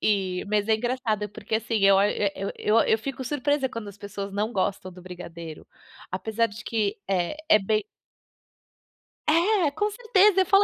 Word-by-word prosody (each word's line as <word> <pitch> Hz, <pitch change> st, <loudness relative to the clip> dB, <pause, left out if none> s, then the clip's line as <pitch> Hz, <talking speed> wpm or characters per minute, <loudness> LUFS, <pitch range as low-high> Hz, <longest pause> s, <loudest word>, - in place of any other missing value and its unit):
E 190 Hz, -3 st, 0 dB
mas 210 Hz, -1 st, +1 dB
é 220 Hz, -, +4 dB
engraçado 220 Hz, -3 st, -1 dB
porque 215 Hz, +2 st, -3 dB
assim, 225 Hz, +1 st, -2 dB
eu 195 Hz, 0 st, +7 dB
o -, -, +5 dB, 0.6 s
eu 215 Hz, +2 st, +2 dB
eu 220 Hz, -, +3 dB
fico 265 Hz, +3 st, -5 dB
surpresa 285 Hz, +1 st, 0 dB
quando 230 Hz, -4 st, -6 dB
as 200 Hz, -, -12 dB
pessoas 200 Hz, -1 st, -6 dB
não 210 Hz, +3 st, -1 dB
gostam 190 Hz, -3 st, -2 dB
do 180 Hz, 0 st, -13 dB
brigadeiro. 170 Hz, -3 st, -9 dB, 0.4 s
Apesar 220 Hz, +5 st, 0 dB
de 220 Hz, +2 st, -11 dB
que 215 Hz, -3 st, -1 dB
é 185 Hz, +5 st, 0 dB
é 215 Hz, -, +8 dB
bem 215 Hz, +1 st, 0 dB, 1.4 s
É, 340 Hz, +1 st, +3 dB
com 415 Hz, +8 st, 0 dB
certeza, 420 Hz, -3 st, +4 dB
eu -, -, +2 dB
falo 395 Hz, +2 st, +5 dB
215 Hz, 170 wpm, -26 LUFS, 195-270 Hz, 1.4 s, é